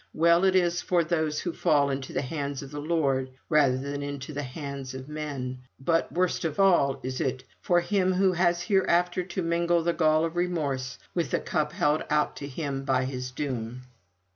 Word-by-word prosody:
Well 170 +2 +4
is 175 -2 +3
it - - -13
for 175 -2 +3
those 155 -2 0
who 175 - -3
fall 140 -2 +2
into 135 -1 -4
the - - -1
hands 140 0 -4
of 135 - -10
the 145 0 -5
Lord 140 -5 +1 0.2
rather 145 -5 +4
than 140 +2 -4
into 140 0 -5
the 145 - -3
hands 140 -1 -6
of 130 0 -7
men; 140 -4 -5 0.2
but 165 +5 +1
worst 180 0 0
of 160 0 -2
all 170 -9 +4
is 130 +2 -3
it 130 -3 -1 0.2
for 175 -1 +3
him 185 0 +1
who 190 +1 +3
has 175 0 +2
hereafter 180 -1 +2
to 185 0 -4
mingle 170 0 +2
the 170 +1 +1
gall 155 -1 +3
of 165 +1 -4
remorse 145 -8 -1 0.2
with 170 -2 -1
the - - +1
cup 150 -1 -1
held 150 -4 +1
out 150 0 +1
to 140 - -6
him 140 -1 -4
by 130 -2 +1
his 130 -1 -4
doom. 125 -3 -4
150 Hz, 195 wpm, -27 LUFS, 135-170 Hz, 0.2 s, Well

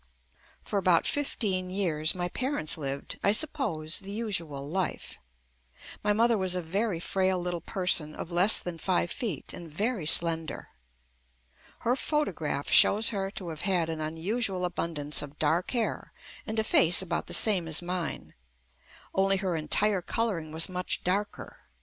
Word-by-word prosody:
For 200 - -2
about 180 -3 +3
fifteen 200 -10 -2
years 165 -5 0
my 175 -1 -2
parents 255 - -1
lived, 140 -2 -6
I 200 - +4
suppose, 215 - +1
the 195 - -10
usual 170 -11 -3
life. 185 +4 -4 0.8
My 210 - +2
mother 230 +1 +2
was 185 -1 +1
a 180 - -1
very 195 +2 -2
frail 190 +1 0
little 175 -1 -4
person 170 -4 +1
of 170 - -7
less 180 +5 +6
than 175 -2 -6
five 175 0 0
feet 215 - -4
and 170 -2 -9
very 200 +1 -2
slender. 165 0 +1 1.1
Her 245 +2 +1
photograph 175 - -2
shows 215 +3 +7
her 195 -3 -3
to 190 -3 -7
have 155 -2 -6
had 180 -4 0
an 160 -1 -4
unusual 180 +5 -1
abundance 160 -4 -1
of 145 0 -10
dark 160 +4 0
hair 235 -3 -3 0.3
and 220 - -4
a 220 - +2
face 175 -3 +5
about 170 -2 -3
the - - +3
same 190 -6 +5
as 160 +2 +1
mine, 180 -1 -5 0.8
only 195 0 +2
her 190 -3 -2
entire 185 +6 +2
coloring 180 -6 -2
was 160 +1 +1
much 180 0 -2
darker. 200 +3 -3
180 Hz, 155 wpm, -28 LUFS, 165-205 Hz, 1.1 s, shows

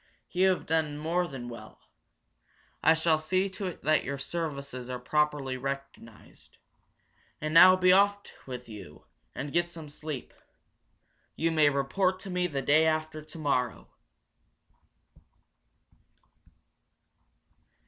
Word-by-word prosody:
You 185 +2 +3
have 185 - -1
done 155 -2 0
more 170 +4 0
than 130 -5 -7
well. 115 -3 -10 1.0
I 160 - +5
shall 160 -1 +2
see 185 +5 0
to 190 +1 -5
it 180 - -8
that 155 +1 +3
your 140 0 -4
services 140 -4 -5
are 125 - -3
properly 145 0 0
recognized. 135 -4 -8 0.8
And 155 0 -3
now 185 +3 +9
be 185 0 +4
off 200 +2 +4 0.3
with 125 -1 -7
you, 105 -3 -11 0.3
and 145 0 -5
get 175 +1 +1
some 160 -3 -10
sleep. 150 -2 -7 1.0
You 165 +1 0
may 155 -2 +4
report 180 +7 0
to 195 - -7
me 180 0 0
the 140 -5 -3
day 155 +2 +4
after 155 0 -1
tomorrow!" 145 -6 -2
155 Hz, 120 wpm, -29 LUFS, 140-175 Hz, 1.0 s, now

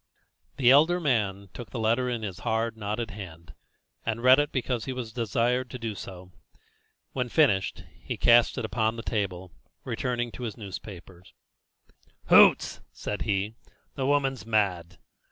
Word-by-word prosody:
The 130 -3 +5
elder 160 +6 +5
man 105 - -1
took 120 -5 -9
the 100 - -6
letter 115 +3 +1
in 120 -3 -3
his 95 -3 -5
hard, 115 0 -1
knotted 110 +2 -4
hand, 85 -6 -10 0.5
and 115 +1 -3
read 130 +2 +7
it 145 0 0
because 125 -3 -2
he 130 - -3
was 120 -3 -6
desired 120 +2 0
to 125 - -6
do 115 -3 -4
so. 90 -2 -10 0.8
When 125 -2 -2
finished, 115 -10 +2 0.2
he - - -5
cast 120 +2 +5
it 120 - -2
upon 110 0 0
the 115 - -7
table, 95 -5 -3 0.3
returning 120 -1 -2
to - - -10
his 110 - -6
newspaper. 95 -4 -9 1.1
"Hoots!" - - +6
said 105 - -5
he; 100 +2 0 0.4
"the 135 -1 -2
woman's 135 -4 +1
mad!" 90 -6 -1
115 Hz, 155 wpm, -27 LUFS, 100-125 Hz, 1.1 s, read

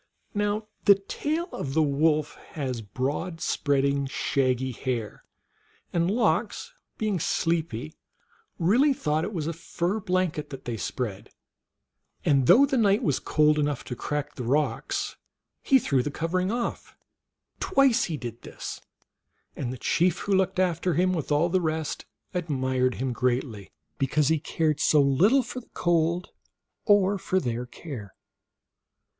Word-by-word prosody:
Now 205 +1 0 0.2
the 200 - +8
tail 300 - -3
of 135 0 -4
the 160 - +4
wolf 150 +1 +2 0.2
has 130 -6 -3
broad 140 - -3
spreading, 140 -5 +1
shaggy 130 -2 0
hair, 120 -4 -4 0.7
and 170 0 +2
Lox, 220 - 0 0.2
being 210 -4 0
sleepy, 160 - -1 0.6
really 245 - +4
thought 155 - 0
it 205 - -3
was 165 -7 -3
a 165 - -2
fur 175 +4 -2
blanket 185 -5 -1
that 135 -2 -9
they 120 - -3
spread, 105 -2 -4 1.0
and 135 -3 +3
though 275 +4 +8
the 270 -2 0
night 205 +2 +3
was 145 - +1
cold 150 0 +3
enough 145 -3 -1
to 125 - -6
crack 145 +3 -3
the 125 - -6
rocks 145 +6 -1 0.4
he 270 - +5
threw 140 - +1
the 145 - -2
covering 180 +6 -1
off; 240 0 -4 0.6
twice 275 -9 +3
he 160 -4 -3
did 120 -3 -7
this, - - -7 0.7
and 125 -3 -3
the 130 - -6
chief 175 +6 +2
who 205 - -1
looked 190 0 +2
after 180 -2 +1
him, 185 +2 +2
with 160 -4 -3
all 150 +4 +3
the 185 +1 +1
rest, 160 -2 -2 0.3
admired 130 -7 0
him 130 -1 -2
greatly 120 -4 -1 0.3
because 140 +2 +2
he 160 -1 +2
cared 155 0 0
so 150 - +4
little 180 - +4
for 250 +2 -6
the 245 - -18
cold 170 +1 +1 0.6
or 205 -1 +4
for 185 +1 0
their 120 -4 -3
care. 125 - -9
155 Hz, 145 wpm, -26 LUFS, 135-185 Hz, 1.0 s, the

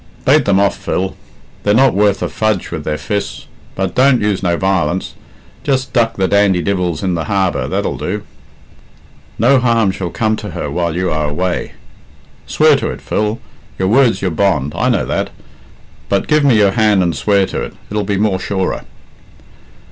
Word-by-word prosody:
Bate 140 0 +4
them 100 -1 +3
off, 100 0 +2
Phil. 95 +1 -2 0.5
They're 105 0 +2
not 130 0 +4
worth 100 0 +2
a - - 0
fudge 110 -4 -1
with - - -4
their 75 - -1
fists. 100 +7 -4 0.3
But 95 -1 -2
don't 130 -1 +4
use 105 -2 0
no 85 -2 0
violence. 95 -2 0 0.5
Just 130 -2 -1
duck 115 -2 +2
the 95 -1 +1
dandy 100 -3 +2
divils 90 -5 -1
in 95 -2 0
the 80 -2 -2
harbour 95 0 0
that'll - - -2
do." - - -3 1.1
"No 130 +4 +4
harm 115 -5 +2
shall 95 -1 -4
come 110 +4 0
to - - -6
her - - -3
while 85 -2 -1
you 90 +1 -1
are 75 -1 -1
away." 90 +4 -2 0.7
"Swear - - +4
to - - -2
it, - - -6
Phil. 105 +2 -1 0.4
Your 95 0 0
word's 120 -1 +3
your 95 - 0
bond, 80 -5 0
I - - +1
know - - +1
that; - - -2 0.8
but 100 - 0
give 150 -1 +3
me 130 -5 +4
your 100 -2 +4
hand 105 -3 +3
and 85 -3 0
swear 100 +6 +2
to - - -4
it - - -6 0.2
it'll 105 0 -1
be 100 0 -1
more 100 -2 +1
surer." 95 -1 -2
100 Hz, 185 wpm, -16 LUFS, 90-110 Hz, 1.1 s, Bate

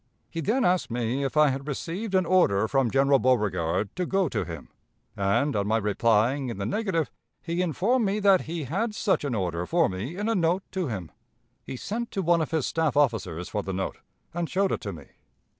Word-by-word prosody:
He 165 - -3
then 235 - +1
asked 180 0 +2
me 120 +3 -1
if 140 +2 -2
I 150 -1 +6
had 135 +2 -4
received 180 - -3
an 185 -1 +3
order 110 - +3
from 135 0 +2
General 135 +2 +4
Beauregard 105 -7 +1
to 180 -1 -2
go 195 -2 +2
to - - -1
him, 80 -3 -8 0.5
and, 100 +8 +1
on 100 -1 0
my 110 +1 +2
replying 115 +5 +2
in 115 - -5
the 100 - -3
negative, 175 - -1 0.3
he 170 +1 -1
informed 205 - +1
me 200 +2 0
that 195 -3 +5
he 165 -1 -3
had 210 - -2
such 205 -8 +1
an 140 -5 -1
order 90 -3 -2
for 170 -1 +3
me 105 - -5
in 210 +2 -2
a 225 - +2
note 180 -1 +1
to 185 -4 -2
him. 95 -9 -5 0.5
He - - -6
sent 235 - -4
to 195 - -1
one 170 0 +3
of 155 - -2
his 160 -4 0
staff 160 -3 0
officers 110 - +1
for 105 - -2
the 95 - -5
note, 95 +1 -3 0.3
and 170 -1 -2
showed 195 0 +1
it - - -1
to 100 - -4
me. 75 -6 -10
145 Hz, 215 wpm, -26 LUFS, 110-185 Hz, 0.5 s, I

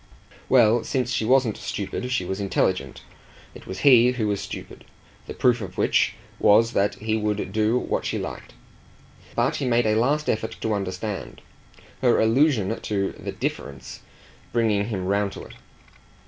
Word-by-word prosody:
Well, 120 -2 +5
since 125 0 -1
she 110 - 0
wasn't 125 -2 +3
stupid 115 +5 -4
she 125 -8 0
was 95 +2 -4
intelligent; 95 -2 -1 0.5
it - - -13
was 95 +1 -6
he 125 -2 +7
who 115 -4 -1
was 100 -1 -1
stupid - - -8 0.4
the - - -7
proof 125 -2 +2
of 90 -3 -8
which - - +2 0.2
was 115 +3 +4
that 100 +1 +1
he 110 0 -2
would 105 -1 -2
do 110 +2 +2
what - - -2
she - - -2
liked. - - -7 0.8
But 120 +6 +1
he 140 - -2
made 120 -1 +2
a 110 - +2
last 140 +7 +1
effort 110 +1 -1
to 110 - 0
understand, 100 +1 -4 0.6
her 125 -2 +4
allusion 115 -3 +2
to 100 -2 -1
the - - -7
"difference" 70 -2 -5 0.5
bringing 110 -4 +1
him 100 -5 -3
round 100 +1 0
to - - -8
it. - - -12
110 Hz, 160 wpm, -24 LUFS, 100-120 Hz, 0.8 s, he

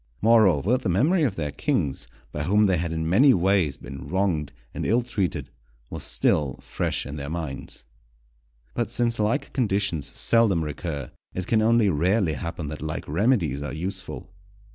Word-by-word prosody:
Moreover, 110 - +4
the 110 - -2
memory 150 - +3
of 125 -10 +1
their 75 -3 -3
kings, 70 -1 -1 0.2
by 75 - -4
whom 105 +7 +3
they 95 -3 +2
had 85 0 -2
in 80 0 -2
many 125 - +5
ways 90 -6 +2
been 70 0 -9
wronged 90 -7 0 0.2
and - - -4
ill 120 +4 +2
treated, 105 -7 -2 0.4
was - - -5
still 70 -4 +1
fresh - - -2
in 70 +3 -6
their 70 0 -5
minds. 80 -6 -6 0.9
But 120 -3 -1
since 120 -1 0
like 115 +7 0
conditions 100 - 0
seldom 105 -5 +3
recur, 75 -3 -5 0.2
it 90 - -3
can 110 +3 +2
only 115 0 +4
rarely 90 +2 +1
happen 80 +3 -5
that 75 - -7
like 75 0 -4
remedies 85 - +1
are 70 -2 -4
useful. 90 +5 -6
90 Hz, 165 wpm, -25 LUFS, 75-110 Hz, 0.9 s, many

